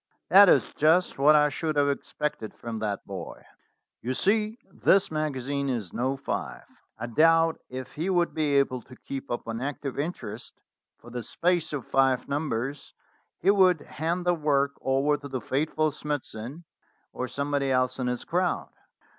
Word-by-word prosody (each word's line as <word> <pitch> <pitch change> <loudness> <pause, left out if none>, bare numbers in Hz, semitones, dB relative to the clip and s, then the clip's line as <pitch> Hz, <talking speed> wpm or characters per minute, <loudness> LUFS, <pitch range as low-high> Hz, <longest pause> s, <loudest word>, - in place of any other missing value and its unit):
"That 195 0 +9
is - - +3
just 160 +1 +3
what 150 +2 +6
I 150 0 +5
should 155 +1 -2
have 145 -1 +3
expected 140 -3 -3
from 115 -2 -6
that 105 -2 -3
boy. - - -8 0.6
You 130 +2 -2
see, 215 - +1
this 195 -3 +3
magazine 140 -2 -2
is 115 -8 -3
'No. 130 +3 -1
5': 140 - -4 0.3
I 115 - -4
doubt 165 +6 +4
if 130 0 -7
he 165 +5 -2
would 175 -2 +2
be 150 -3 +1
able 130 -2 +2
to 125 - -15
keep 135 +2 -7
up 120 - -3
an 115 +1 -4
active 140 0 -4
interest 130 - -5 0.4
for 120 - -14
the 120 0 -4
space 170 +5 0
of 145 -5 -4
five 135 -2 +2
numbers; 140 -2 -3 0.4
he 190 - +4
would 185 -5 +4
hand 170 +5 -3
the 175 - +4
work 145 -4 +1
over 135 +3 +2
to 145 0 -9
the 130 -2 -3
faithful 155 +5 0
Smithson, 145 -1 -5 0.5
or 125 - -3
somebody 140 +1 -1
else 130 0 +1
in 125 - -1
his 125 -1 -2
crowd." 180 +1 -1
140 Hz, 165 wpm, -27 LUFS, 130-160 Hz, 0.6 s, That